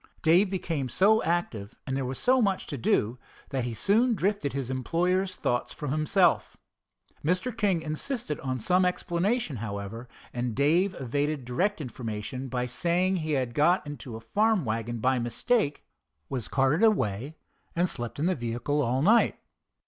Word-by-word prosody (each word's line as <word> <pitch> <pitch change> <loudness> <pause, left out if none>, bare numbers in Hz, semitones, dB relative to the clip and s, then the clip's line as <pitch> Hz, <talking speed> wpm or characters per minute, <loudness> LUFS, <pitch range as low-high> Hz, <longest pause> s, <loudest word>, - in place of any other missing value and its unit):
Dave 175 +5 +5
became 165 -8 -2
so 215 - +4
active, 125 -12 -2
and 130 - -2
there 135 -2 -1
was 130 - -4
so 255 0 +3
much 195 -4 +1
to 145 - -5
do, 115 -1 +1 0.3
that 130 -3 -1
he 120 -2 -4
soon 225 - +3
drifted 200 -7 0
his 135 -2 -3
employer's 180 +8 0
thoughts 120 0 -1
from 150 -4 -4
himself. 165 +4 +2 0.7
Mr. 185 +9 0
King 200 -7 +1
insisted 160 - -3
on 130 -1 -3
some 180 +11 +3
explanation, 180 - 0
however, 110 +2 -6 0.2
and 120 -2 -2
Dave 170 +8 +2
evaded 145 +2 -1
direct 180 +12 0
information 125 -1 -5
by 125 -1 -2
saying 175 +8 +1
he 155 -2 -2
had 130 -4 0
got 170 +7 +3
into 130 -5 -7
a - - -6
farm 210 - +1
wagon 115 +1 -2
by 130 +3 +1
mistake, 145 - 0 0.4
was 125 -6 -3
carted 135 - +2
away, 145 - +1 0.4
and 175 +2 +2
slept 120 -8 -4
in 150 - 0
the 185 - +3
vehicle 120 +2 -1
all 130 +1 +1
night. 225 +7 +4
145 Hz, 160 wpm, -28 LUFS, 125-185 Hz, 0.7 s, Dave